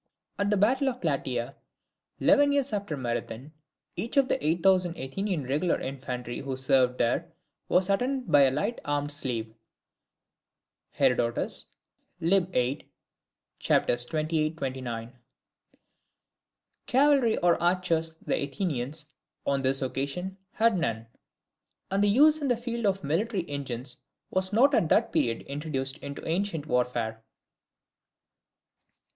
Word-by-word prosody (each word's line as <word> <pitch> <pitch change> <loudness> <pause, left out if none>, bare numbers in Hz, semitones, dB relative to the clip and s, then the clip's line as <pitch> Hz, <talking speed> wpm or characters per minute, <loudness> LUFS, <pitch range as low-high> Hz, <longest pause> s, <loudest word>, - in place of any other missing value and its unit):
[At 200 0 +1
the 210 - +2
battle 260 +7 +3
of 250 -1 -6
Plataea, 135 -5 -2 0.7
eleven 285 0 +5
years 280 -4 +1
after 200 -7 -2
Marathon, 120 +2 -4 0.4
each 225 +10 -4
of 275 -2 +5
the - - 0
eight 165 +3 0
thousand 185 -3 +3
Athenian 175 +4 -3
regular 145 +7 0
infantry 125 -2 -5
who 135 -1 -4
served 130 -1 +2
there, 165 +9 0 0.4
was 180 +1 +3
attended 250 +6 0
by 145 - +7
a 135 - +6
light 205 - -2
armed 145 0 -1
slave. 120 -6 -3 1.4
(Herod. 120 0 +1 0.8
lib. 180 +2 +2
viii. 125 -2 +1 0.8
c. - - -7
28,29.)] 130 -3 -1 1.7
Cavalry 265 -3 +4
or 175 -1 +2
archers 170 -2 +1
the - - 0
Athenians 145 -1 -2 0.4
(on 140 -1 +1
this 135 +1 +1
occasion) 140 +9 -3 0.2
had 225 -4 +3
none: 115 -8 -2 0.9
and 195 +1 +2
the 205 - +4
use 300 +8 +5
in 290 - -2
the 245 -3 +2
field 235 -2 -2
of 195 0 0
military 180 - -1
engines 130 -3 -5 0.3
was 185 0 +1
not 260 +7 +4
at 170 -10 +3
that - - +3
period 115 -1 +1
introduced 140 -1 -3
into 140 0 -7
ancient 165 -2 -1
warfare. 120 -4 -1
155 Hz, 125 wpm, -28 LUFS, 130-200 Hz, 1.7 s, by